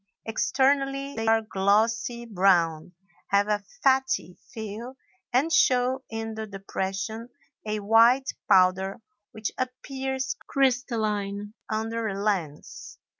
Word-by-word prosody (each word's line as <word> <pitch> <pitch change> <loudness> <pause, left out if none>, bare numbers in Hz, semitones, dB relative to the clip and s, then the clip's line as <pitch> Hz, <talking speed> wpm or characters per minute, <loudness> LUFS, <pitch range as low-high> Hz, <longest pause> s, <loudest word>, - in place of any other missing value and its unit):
Externally 275 +4 +1
they 225 -3 -3
are 225 0 +4
glossy 225 +4 +1
brown, 180 -6 +2 0.3
have 200 +1 +2
a 210 -1 0 0.2
fatty 265 -9 +2 0.2
feel, 230 +2 -7 0.3
and 280 +7 +2
show 255 -2 +3
in 225 0 -4
the 220 0 -5
depression 195 +3 -4 0.4
a 210 0 -2
white 230 +5 +5 0.2
powder 190 +1 +4 0.3
which 215 -1 -4
appears 265 - -3
crystalline 215 -6 0 0.2
under 225 +1 -2
a 195 -2 -3
lens. 185 -8 -3
225 Hz, 105 wpm, -26 LUFS, 200-255 Hz, 0.4 s, white